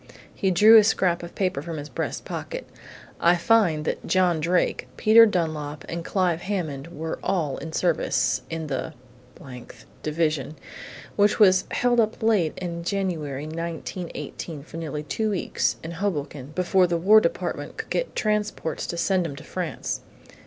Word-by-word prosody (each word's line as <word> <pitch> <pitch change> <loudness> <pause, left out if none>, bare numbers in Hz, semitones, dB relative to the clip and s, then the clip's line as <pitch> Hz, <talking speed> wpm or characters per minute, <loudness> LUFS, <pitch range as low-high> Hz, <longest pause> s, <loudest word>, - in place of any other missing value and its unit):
He 195 - 0
drew 215 +5 +8
a 215 - +8
scrap 185 -5 +2
of 170 0 -9
paper 185 -8 0
from 165 +1 -6
his 145 0 -6
breast 130 - -4
pocket. - - -6 0.5
"I 170 +1 +5
find 170 -4 +3
that - - -2
John 180 -3 +3
Drake, 170 -5 0
Peter 225 +1 +7
Dunlap 155 -6 -2
and 170 0 -4
Clive 175 -2 0
Hammond 165 -9 -3
were 160 -1 -5
all 155 -8 -1
in 160 +3 -7
service, 130 -7 +1
in 165 -1 -4
the 135 -3 -4 0.5
th 125 -3 -11 0.2
Division, 155 -2 -1 0.6
which 205 0 +3
was 190 -4 +5
held 245 -1 +2
up 220 0 0
late 205 -8 +2
in 170 -2 -4
January, 165 -7 -2
1918, 165 -1 -6
for 160 - -10
nearly 150 -2 -4
two 215 +9 -1
weeks, 200 -4 0
in 165 - -5
Hoboken, 150 -7 -3
before 180 0 +3
the 170 -1 0
War 210 +6 +6
Department - - -3
could - - -6
get - - -1
transports 210 -6 -1
to 170 - -4
send 185 -1 +1
'em 140 - -7
to 140 - -10
France. 165 - -4
170 Hz, 160 wpm, -25 LUFS, 155-190 Hz, 0.6 s, drew